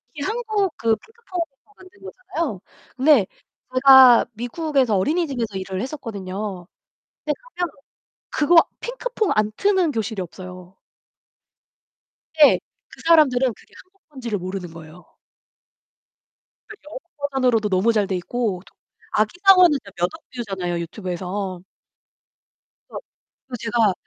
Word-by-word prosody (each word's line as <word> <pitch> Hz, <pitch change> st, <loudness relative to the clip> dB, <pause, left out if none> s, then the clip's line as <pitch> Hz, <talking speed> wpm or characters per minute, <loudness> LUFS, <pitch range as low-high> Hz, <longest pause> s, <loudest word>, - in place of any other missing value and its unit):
이 285 Hz, -, -7 dB
한국 430 Hz, -1 st, -1 dB
그 225 Hz, -1 st, +2 dB
핑크퐁에서 375 Hz, -, -8 dB
만든 375 Hz, +1 st, -18 dB
거잖아요. 335 Hz, -, -5 dB, 0.4 s
근데 265 Hz, -5 st, +5 dB, 0.5 s
제가 260 Hz, -2 st, +8 dB
미국에서 250 Hz, 0 st, 0 dB
어린이집에서 250 Hz, -, -1 dB
일을 190 Hz, 0 st, -4 dB
했었거든요. 200 Hz, -, -6 dB, 0.6 s
근데 300 Hz, -, +1 dB, 0.2 s
가면 355 Hz, -1 st, -1 dB, 0.6 s
그거 310 Hz, +3 st, +2 dB, 0.2 s
핑크퐁 -, -, -2 dB
안 215 Hz, 0 st, +1 dB
트는 380 Hz, -5 st, +2 dB
교실이 220 Hz, -3 st, -3 dB
없어요. 180 Hz, +1 st, -11 dB, 1.6 s
근데 295 Hz, -2 st, +6 dB, 0.3 s
그 -, -, -15 dB
사람들은 265 Hz, -7 st, +4 dB
그게 -, -, -23 dB
한국 380 Hz, -1 st, -38 dB
거인지를 240 Hz, -7 st, -4 dB
모르는 185 Hz, -1 st, -6 dB
거예요. 165 Hz, +1 st, -13 dB, 1.6 s
네 -, -, -9 dB
영어 300 Hz, -, -8 dB, 0.2 s
버전으로도 255 Hz, -6 st, +1 dB
너무 195 Hz, +4 st, +2 dB
잘돼 200 Hz, -3 st, 0 dB
있고 200 Hz, 0 st, -3 dB, 0.5 s
아기상어는 360 Hz, -, +5 dB
진짜 200 Hz, -, -13 dB
몇 175 Hz, -, +2 dB
억 320 Hz, -, -8 dB
뷰잖아요, 190 Hz, -7 st, -3 dB
유튜브에서. 185 Hz, +1 st, -5 dB, 1.3 s
그래서 -, -, -6 dB, 0.5 s
그래서 245 Hz, -2 st, -6 dB
제가 225 Hz, -3 st, +2 dB
240 Hz, 285 characters per minute, -22 LUFS, 195-320 Hz, 1.6 s, 제가